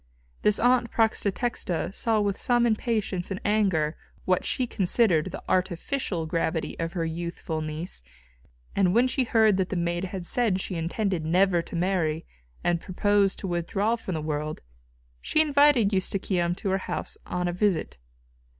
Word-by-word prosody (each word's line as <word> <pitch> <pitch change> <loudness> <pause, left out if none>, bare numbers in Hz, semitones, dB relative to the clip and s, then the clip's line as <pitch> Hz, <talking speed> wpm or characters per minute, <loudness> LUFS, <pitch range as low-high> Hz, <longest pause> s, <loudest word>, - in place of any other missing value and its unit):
This 210 0 +2
aunt 245 0 +3
Prætextata 220 -4 0
saw 225 +1 +1
with 200 -1 0
some 240 -1 +3
impatience 215 -5 0
and 195 -1 -3
anger 190 -8 +2 0.3
what 185 -1 +2
she 255 - 0
considered 190 -6 +2
the - - -7
artificial 180 0 -1
gravity 160 0 -1
of 165 0 -2
her 170 -3 -1
youthful 165 -1 -4
niece, 155 - -5 0.7
and 190 -1 +3
when 245 +2 +5
she 255 0 0
heard 220 -4 +4
that 190 -1 0
the - - -3
maid 175 +1 -1
had 185 -1 -5
said 220 -3 +1
she 190 - -4
intended 175 +1 -1
never 175 +2 +3
to 170 - -9
marry, 170 -3 0 0.4
and 170 -1 +1
purposed 200 +1 +1
to 195 - -4
withdraw 195 +6 0
from 195 -6 -5
the 155 - -2
world, 150 0 -3 0.6
she - - +1
invited 285 -8 +4
Eustochium 185 -2 0
to 195 - -3
her 190 - +1
house - - -5
on 180 0 -1
a 175 - -1
visit. 180 - 0
190 Hz, 160 wpm, -26 LUFS, 170-215 Hz, 0.7 s, when